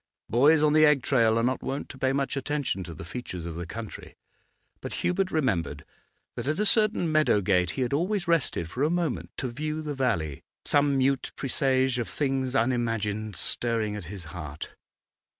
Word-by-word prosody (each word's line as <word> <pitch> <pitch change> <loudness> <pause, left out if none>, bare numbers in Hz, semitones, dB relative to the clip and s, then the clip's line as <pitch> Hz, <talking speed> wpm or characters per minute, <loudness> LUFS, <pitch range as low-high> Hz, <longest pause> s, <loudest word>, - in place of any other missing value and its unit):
Boys 145 +6 +5
on 150 -1 +4
the 155 0 +6
egg 150 -3 +5
trail 115 -4 +3
are 115 - +2
not 130 +2 0
wont 140 +2 -3
to - - -10
pay 130 0 +2
much 135 0 -1
attention 140 -7 -2
to 85 -2 -8
the 80 - -8
features 90 -4 -6
of 85 - -4
the 85 +1 -6
country; 110 +3 -8 0.6
but - - -6
Hubert 185 +1 +1
remembered 115 - -1 0.5
that 120 +2 -5
at 155 +2 0
a 210 - +1
certain 215 -6 +2
meadow 155 -9 +4
gate 90 -3 +2
he 130 - +2
had 125 - -2
always 180 +5 0
rested 160 - +1
for 125 +10 -5
a 150 - +3
moment 170 -5 -1
to 130 - -2
view 155 +5 -3
the 150 -1 -3
valley, 85 - -1 0.2
some 145 -1 +3
mute 135 0 +1
presage 130 -1 +1
of 115 -6 -3
things 135 +2 -1
unimagined 110 -4 0
stirring 110 +4 0
at 100 -4 -6
his 95 +1 -7
heart. 75 0 -7
130 Hz, 185 wpm, -27 LUFS, 105-150 Hz, 0.6 s, the